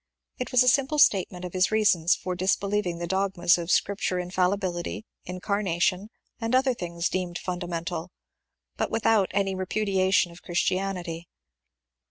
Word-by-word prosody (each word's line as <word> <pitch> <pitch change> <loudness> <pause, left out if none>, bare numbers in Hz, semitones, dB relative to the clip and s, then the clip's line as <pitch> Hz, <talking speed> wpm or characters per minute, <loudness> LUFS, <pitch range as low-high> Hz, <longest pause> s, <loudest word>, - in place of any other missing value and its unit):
It 250 - -4
was 255 0 +5
a - - -1
simple 275 +4 +3
statement 185 -9 +3
of 180 - -7
his 185 0 +2
reasons 200 -6 +3
for 185 - -4
disbelieving 190 0 0
the 170 - -4
dogmas 180 -1 +2
of 170 0 -5
Scripture 195 -1 +1
inMlibility, 180 +1 -1 0.2
incarnation, 185 +1 -1 0.3
and 230 +2 0
other 260 0 +3
things 170 -5 -3
deemed 180 -2 -3
fundamental, 175 -1 -4 0.7
but - - -1
without 220 -3 +2
any 195 -1 0
repu 190 +3 -2
diation 190 -2 +2
of 170 - -14
Christianity. 180 -2 -2
185 Hz, 140 wpm, -26 LUFS, 175-205 Hz, 0.7 s, was